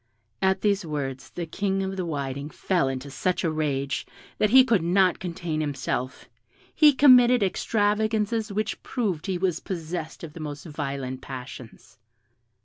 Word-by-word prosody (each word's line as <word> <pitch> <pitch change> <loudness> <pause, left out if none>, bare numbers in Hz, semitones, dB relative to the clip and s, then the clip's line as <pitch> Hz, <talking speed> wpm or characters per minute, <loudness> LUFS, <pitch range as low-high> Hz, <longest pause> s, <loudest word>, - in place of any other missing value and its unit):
At 190 0 +2
these 205 -1 +1
words 140 -4 -4
the 175 - -5
King 195 +3 -1
of 190 0 -3
the 185 -2 -3
Whiting 140 -2 -4
fell 175 -3 0
into 135 +1 -4
such 180 +7 -1
a 165 - +1
rage, 140 -3 -2 0.3
that 210 - +3
he 260 +4 +8
could 230 -8 +3
not 180 +2 +3
contain 170 -3 -3
himself: 130 -3 -3 0.5
he 305 -1 +7
committed 250 -4 +6
extravagances 215 +2 0
which 215 +2 -2
proved 205 - -2
he 190 -2 -1
was 180 -2 0
possessed 165 -3 -5
of 155 -3 -8
the 170 - -10
most 145 -1 -6
violent 140 -4 -4
passions. 130 -3 -10
175 Hz, 150 wpm, -25 LUFS, 145-205 Hz, 0.5 s, he